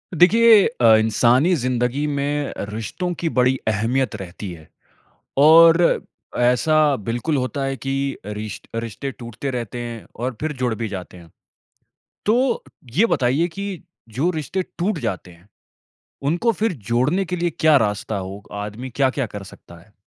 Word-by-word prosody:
देखिए 220 +4 +6 0.2
अ, 115 -1 +7
इंसानी 120 +9 +3
ज़िन्दगी 125 +1 -1
में 145 0 -2 0.2
रिश्तों 150 - -4
की 165 - 0
बड़ी 130 +1 +4
अहमियत 115 +4 0
रहती 95 0 -7
है। 80 -2 -12 0.7
और 165 +3 +6 0.4
ऐसा 125 +5 +2 0.2
बिल्कुल 120 +8 -2
होता 135 +1 -2
है 135 0 -2
कि 135 +1 -2
अ, - - -8
रिश 105 0 -6
रिश्ते 115 +4 -4
टूटते 120 +2 -6
रहते 120 -2 -4
हैं 120 -2 -6
और 125 +1 -3
फिर 155 0 -2
जुड़ 120 -3 +1
भी 115 0 -4
जाते 95 -2 -7
हैं। 85 -2 -15 1.0
तो 240 +3 +2 0.3
ये 220 +6 +5
बताइए 145 - +1
की 195 0 -6 0.4
जो 165 +6 +2
रिश्ते 165 +3 -3 0.2
टूट 180 +1 0
जाते 100 - -4
है, 85 +2 -19 0.8
उनको 175 +11 +1
फिर 220 +1 -1 0.2
जोड़ने 145 +11 +2
के 180 0 -3
लिए 175 0 0
क्या 155 -2 +6
रास्ता 105 -3 0
हो? 95 +2 -7
आदमी 105 +5 -6
क्या-क्या 135 +1 0
कर 105 -1 -8
सकता 85 -2 -14
है? 100 +5 -23
130 Hz, 150 wpm, -21 LUFS, 110-160 Hz, 1.0 s, अ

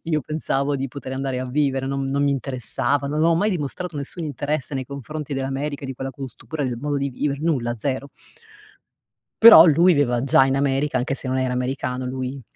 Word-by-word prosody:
io 160 -2 0
pensavo 145 -2 -1
di 135 0 -2
poter 130 0 -8
andare 135 -1 -2
a 130 - -4
vivere, 135 0 0
non 135 0 -2
non 140 +1 0
mi 140 - +2
interessava, 135 0 -2
non 150 +2 -1
ho 165 +1 +4
mai 205 +6 +1
dimostrato 175 0 -4
nessun 160 +4 -6
interesse 145 0 -3
nei 130 -1 -3
confronti 140 +2 -6
dell'America 135 +2 -3
di 135 - -4
quella 135 +1 -5
cultura, 135 +3 -6
del 125 -2 -3
modo 145 +2 -2
di 140 0 -1
vivere, 140 +2 -2
nulla, 125 -8 0
0. 135 +4 -3 1.3
Però 225 -8 +11
lui 170 +3 +5
viveva 125 -5 +1
già 135 0 +5
in 135 0 0
America, 140 +1 0
anche 135 +3 -1
se 130 -1 -7
non 130 - 0
era 130 -1 0
americano, 125 0 -2
lui 130 +1 -5
140 Hz, 195 wpm, -22 LUFS, 130-150 Hz, 1.3 s, Però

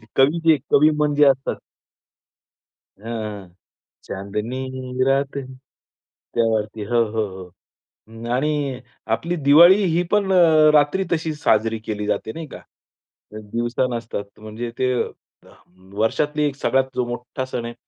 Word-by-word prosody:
कवी 145 +5 +3
जे, 155 -2 +6
कवी 150 +2 +6
मन 150 -1 +1
जे 150 0 +5
असतात. 135 -1 +2 1.4
अ, 105 -3 -6 0.6
चांदनी 125 +6 -4
रात 135 +1 +1
है. 140 - -2 0.9
त्यावरती. 110 -2 0
हो, 120 +2 +2
हो, 110 -1 0 0.6
हो. 115 +1 -14
आणि 140 -1 -1 0.4
आपली 170 +8 -4
दिवाळी 175 +8 +7
ही 175 -1 +1
पण 205 -2 +2
अ, 160 -4 +6
रात्री 150 +6 +3
तशी 160 -1 -1
साजरी 115 -5 +1
केली 105 -1 -3
जाते 110 - -2
नाही 165 -1 -7
का? - - -10 0.7
दिवसा 115 +4 -2
नसतात. 115 -3 -5
म्हणजे 110 +2 -6
ते 130 0 +1 1.1
वर्षातली 150 +7 0
एक 140 - -4
सगळ्यात 135 -1 +1
जो 125 -1 0
मोठा 125 +2 -5
सण 120 -2 -5
आहे. 120 - -6
130 Hz, 130 wpm, -21 LUFS, 115-150 Hz, 1.4 s, दिवाळी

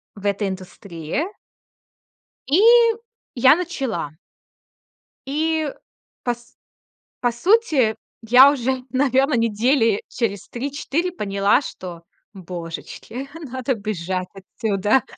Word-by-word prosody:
в 200 - -11
этой 200 0 0
индустрии. 185 - -5 1.3
И 315 +8 +4 0.7
я 260 +4 +6
начала. 260 - -3 1.1
И 315 +1 0 0.5
по 245 -1 0
с 240 +1 -22 0.6
по 245 -1 +1
сути, 295 - +3 0.3
я 255 +5 +8
уже, 260 -1 -1
наверно, 265 +2 +2
недели 230 0 +2
через 205 -5 -3
3-4 285 +7 -2
поняла, 200 - +2
что, 175 -9 -8 0.3
божечки, 185 +8 -7 0.2
надо 260 +1 -2
бежать 185 -3 -3
отсюда. 205 +4 0
235 Hz, 90 wpm, -22 LUFS, 195-275 Hz, 1.3 s, я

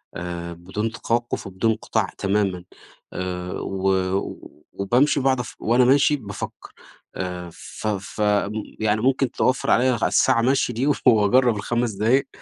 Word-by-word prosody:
آآ 85 -1 -5
بدون 95 +6 -4
توقف 120 -1 -2
وبدون 95 +4 0
انقطاع 110 - -1
تمامًا، 100 -3 0 0.5
آآ 90 -1 -4
و 95 0 -3 0.3
و - - -8
وبامشي 125 +10 +2
وباقعد 130 -1 +2
اف 125 - -6
وأنا 120 +3 +3
ماشي 140 +3 +4
بافكّر، 100 -8 -8 0.4
آآ 90 -1 -5
ف - - -8
ف 100 0 -3
م 105 -1 +2 0.3
يعني 110 0 +1
ممكن 130 0 +1
توفّر 130 - +1
عليّا 125 0 +3
ع - - +3
الساعة 130 -3 +3
مَشي 130 0 +1
دي 125 +5 -1
وف 145 - 0
وأجرّب 115 +2 +4
ال5 120 +3 -1
دقايق، 115 +7 +2
110 Hz, 150 wpm, -23 LUFS, 95-125 Hz, 0.5 s, ماشي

